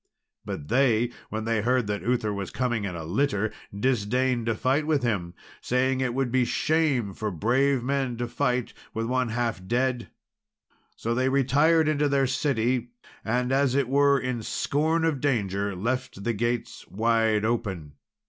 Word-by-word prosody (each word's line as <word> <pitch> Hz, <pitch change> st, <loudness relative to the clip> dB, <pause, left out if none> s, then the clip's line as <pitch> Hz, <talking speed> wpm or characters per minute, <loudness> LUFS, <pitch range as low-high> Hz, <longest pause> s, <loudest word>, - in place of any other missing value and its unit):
But 70 Hz, -, -6 dB
they, 120 Hz, -, +2 dB, 0.2 s
when 110 Hz, 0 st, -4 dB
they 115 Hz, -1 st, +1 dB
heard 125 Hz, +2 st, +2 dB
that 105 Hz, 0 st, -2 dB
Uther 115 Hz, -3 st, 0 dB
was 100 Hz, -2 st, -4 dB
coming 120 Hz, -3 st, -1 dB
in 90 Hz, -3 st, -4 dB
a 80 Hz, -, -5 dB
litter, 110 Hz, -, 0 dB, 0.2 s
disdained 120 Hz, +2 st, 0 dB
to 115 Hz, -, +1 dB
fight 135 Hz, +7 st, +1 dB
with 150 Hz, -4 st, +1 dB
him, 95 Hz, -7 st, -1 dB, 0.3 s
saying 130 Hz, +1 st, +1 dB
it 125 Hz, -2 st, -1 dB
would 135 Hz, -2 st, 0 dB
be 130 Hz, 0 st, +3 dB
shame 140 Hz, -7 st, +1 dB
for 110 Hz, +3 st, -3 dB
brave 125 Hz, -, +1 dB
men 135 Hz, -2 st, -1 dB
to 120 Hz, 0 st, -2 dB
fight 125 Hz, 0 st, -1 dB, 0.2 s
with 115 Hz, 0 st, -1 dB
one 125 Hz, 0 st, 0 dB
half 115 Hz, -4 st, -2 dB
dead. 125 Hz, +1 st, 0 dB, 0.9 s
So 115 Hz, -, -2 dB
they 130 Hz, +2 st, +1 dB
retired 145 Hz, +4 st, +3 dB
into 150 Hz, -1 st, +2 dB
their 140 Hz, -1 st, +2 dB
city; 125 Hz, -2 st, 0 dB, 0.3 s
and, 125 Hz, +3 st, 0 dB
as 135 Hz, -1 st, +2 dB
it 140 Hz, -3 st, +2 dB
were 140 Hz, +1 st, +4 dB
in 125 Hz, -2 st, -3 dB
scorn 160 Hz, +8 st, 0 dB
of 150 Hz, -5 st, 0 dB
danger, 100 Hz, -7 st, 0 dB
left 120 Hz, +1 st, -3 dB
the 120 Hz, +2 st, 0 dB
gates 120 Hz, +2 st, -3 dB
wide 110 Hz, 0 st, +1 dB
open. 95 Hz, -10 st, -2 dB
120 Hz, 165 wpm, -26 LUFS, 110-135 Hz, 0.9 s, were